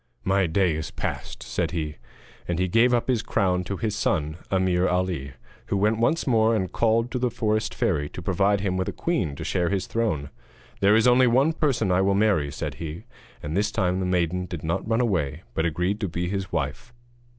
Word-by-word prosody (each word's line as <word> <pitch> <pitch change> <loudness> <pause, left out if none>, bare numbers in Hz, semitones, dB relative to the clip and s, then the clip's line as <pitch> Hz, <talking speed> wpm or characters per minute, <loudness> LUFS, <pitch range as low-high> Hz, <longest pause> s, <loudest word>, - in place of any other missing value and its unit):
'My 95 -1 +2
day 90 +1 +2
is 80 -1 -4
past,' - - -5
said 85 -2 -2
he. 80 -3 -4 0.5
And 85 - -1
he 90 +1 +1
gave 115 +7 +4
up 120 -1 +1
his 125 -4 +1
crown 90 -5 0
to 100 - -4
his 105 0 -2
son 80 -8 0
Ameer 95 -1 +2
Ali, 90 -7 -1 0.3
who 100 - 0
went 105 +3 +2
once 135 +8 +1
more 115 -3 +3
and 95 -4 -1
called 115 +1 +1
to 125 - -2
the 125 0 +1
forest 110 -2 -1
fairy 75 0 0
to 90 - -8
provide 100 +2 +2
him 95 -2 -1
with 95 - -1
a - - -5
queen 95 - -1
to - - -6
share 90 -2 0
his 100 -1 -1
throne. 80 -12 -1 0.5
'There 100 +2 +5
is 115 +2 +4
only 125 +1 +5
one 135 +7 +3
person 130 - +1
I 90 +1 +3
will 100 0 +2
marry,' 100 -9 +2
said - - -4
he. 80 +4 -6 0.4
And 75 +2 -4
this 105 +2 +2
time 95 -4 0
the 95 - -1
maiden 90 0 0
did 85 -4 -6
not 80 +6 -2
run 115 +2 +2
away, 80 - -1
but 80 +5 +1
agreed 90 +6 -1
to 105 - -1
be 85 +2 -2
his 95 0 -3
wife. 80 - -3
95 Hz, 215 wpm, -25 LUFS, 85-110 Hz, 0.5 s, There